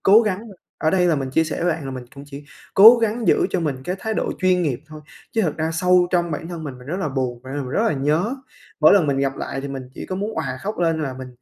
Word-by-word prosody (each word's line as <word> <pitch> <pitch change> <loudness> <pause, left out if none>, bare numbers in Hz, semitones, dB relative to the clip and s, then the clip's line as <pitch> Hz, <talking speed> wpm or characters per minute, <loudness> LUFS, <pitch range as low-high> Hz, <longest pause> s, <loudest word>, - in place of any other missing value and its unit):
cố 205 +3 +7
gắng 205 -3 -1 0.4
ở 155 - +1
đây 180 -1 +3
là 170 - +3
mình 135 -2 -3
chia 160 +5 +2
sẻ 160 - -4
với 175 - +3
bạn 160 -2 -6
là 135 - -5
mình 130 -1 -7
cũng 140 0 -10
chỉ 140 0 -10 0.3
cố 225 +5 +10
gắng 225 0 -1
giữ - - +4
cho 185 - 0
mình 150 -5 -1
cái 180 +5 -2
thái 220 +2 -3
độ - - -1
chuyên 185 -1 +2
nghiệp 135 -6 -1
thôi, 155 0 -11 0.3
chứ 225 - +1
thật 160 -6 -1
ra 160 0 -1
sâu 180 +2 +3
trong 175 -2 +1
bản 160 +2 -4
thân 170 -2 -6
mình, 135 -4 -7
mình 125 - -14
rất 165 +5 -3
là 155 - -1
buồn, 130 -3 -3
và 130 - -10
r - - -4
mình 135 -3 -4
rất 170 +11 0
là - - +2
nhớ. 155 - 0 0.5
Mỗi 155 - +7
lần 180 -7 +4
mình 140 -1 0
gặp 135 0 -1
lại 135 - -4
thì 140 - -6
mình 135 -1 -5
chỉ - - -7
có 185 - -4
muốn 205 +3 -3
òa 135 -5 -3
khóc 210 +2 -4
lên 165 -2 +1
là 135 -3 -3
mình 130 -1 -7
160 Hz, 305 wpm, -21 LUFS, 135-185 Hz, 0.5 s, cố